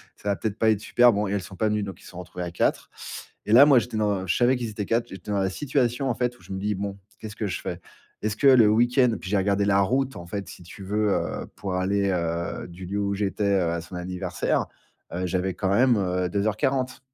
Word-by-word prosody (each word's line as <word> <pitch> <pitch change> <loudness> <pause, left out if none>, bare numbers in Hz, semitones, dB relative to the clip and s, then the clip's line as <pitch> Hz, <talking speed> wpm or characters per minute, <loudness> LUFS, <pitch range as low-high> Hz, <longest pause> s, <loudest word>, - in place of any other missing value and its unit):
ça 105 - -5
va 100 - +2
peut-être 110 0 -3
pas 110 - +4
être 110 -2 +2
super. 120 +2 +5
Bon 105 0 0
et - - -3
elles 100 - 0
sont 95 +1 -10
pas 110 +3 0
venues 105 -1 0
donc 95 -1 -7
ils - - -18
se - - -12
sont 90 - -9
retrouvées 90 0 -7
à 85 - -5
4. - - 0 0.5
Et 105 - +1
là 135 +4 +10
moi 135 -4 +6
j'étais 115 -1 -5
dans 100 -3 0
je - - +1
savais 125 +2 +4
qu'ils 120 -2 -3
étaient 105 -1 -4
4, 115 +2 0
j'étais 95 +2 -8
dans 100 - +1
la 95 -1 +1
situation 135 -1 0
en - - +2
fait 125 -1 -1
où - - -21
je - - -12
me 95 - -3
dis: 105 +1 -1
«Bon 100 0 -4 0.2
qu'est-ce 110 -2 -8
que 105 - -2
je 90 -7 -3
fais? - - -5 0.4
Est-ce 110 -1 -1
que 140 - +3
le 125 -5 +7
week-end» 120 +2 +3
puis 95 - -7
j'ai 105 - +3
regardé 100 +1 +1
la 100 -1 +3
route 135 +6 0
en 85 0 -9
fait 100 +2 -5
si - - -11
tu 90 +3 -11
veux, 105 +2 0
heu, - - -2
pour 95 -2 -4
aller, 100 +1 +1
heu, 85 0 -2
du 90 +2 -10
lieu 100 +3 -3
où 100 0 0
j'étais, 100 0 0
à 85 -2 0
son 90 +2 -10
anniversaire, 90 0 -2 0.5
heu, 90 +1 -2
j'avais 95 +1 -1
quand 95 - -1
même 120 +4 +4
heu 90 -2 0
2:40. 110 +7 0
100 Hz, 265 wpm, -25 LUFS, 95-115 Hz, 0.5 s, là